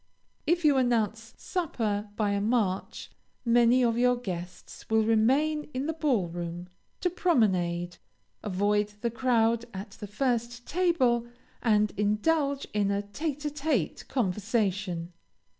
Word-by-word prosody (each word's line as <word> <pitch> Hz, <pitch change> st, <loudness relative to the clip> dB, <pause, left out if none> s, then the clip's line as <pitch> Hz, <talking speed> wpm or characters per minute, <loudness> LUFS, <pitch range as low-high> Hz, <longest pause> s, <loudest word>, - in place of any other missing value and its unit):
If 340 Hz, 0 st, +2 dB
you 290 Hz, -3 st, +5 dB
announce 230 Hz, -2 st, 0 dB
supper 220 Hz, -, -2 dB
by 210 Hz, -2 st, +1 dB
a 200 Hz, 0 st, 0 dB
march, 210 Hz, -4 st, -1 dB, 0.3 s
many 240 Hz, +1 st, +5 dB
of 235 Hz, -1 st, +2 dB
your 250 Hz, 0 st, +4 dB
guests 180 Hz, -6 st, -7 dB
will 220 Hz, 0 st, +3 dB
remain 270 Hz, +8 st, +2 dB
in 260 Hz, +2 st, -1 dB
the 320 Hz, -, -1 dB
ball 275 Hz, -, +1 dB
room, 175 Hz, +1 st, -6 dB, 0.3 s
to 360 Hz, -, +2 dB
promenade, 180 Hz, -, +1 dB, 0.4 s
avoid 205 Hz, +1 st, 0 dB
the 235 Hz, -, 0 dB
crowd 235 Hz, -2 st, +2 dB
at 200 Hz, +2 st, -6 dB
the 205 Hz, -, -9 dB
first 240 Hz, +2 st, -1 dB
table, 280 Hz, -9 st, +2 dB, 0.3 s
and 210 Hz, -3 st, +3 dB
indulge 275 Hz, +8 st, +1 dB
in 205 Hz, -1 st, +1 dB
a 200 Hz, 0 st, 0 dB
tête 290 Hz, +8 st, -4 dB
à 295 Hz, -, -2 dB
tête 285 Hz, -, -1 dB
conversation. 200 Hz, -5 st, -1 dB
225 Hz, 130 wpm, -28 LUFS, 205-260 Hz, 0.4 s, you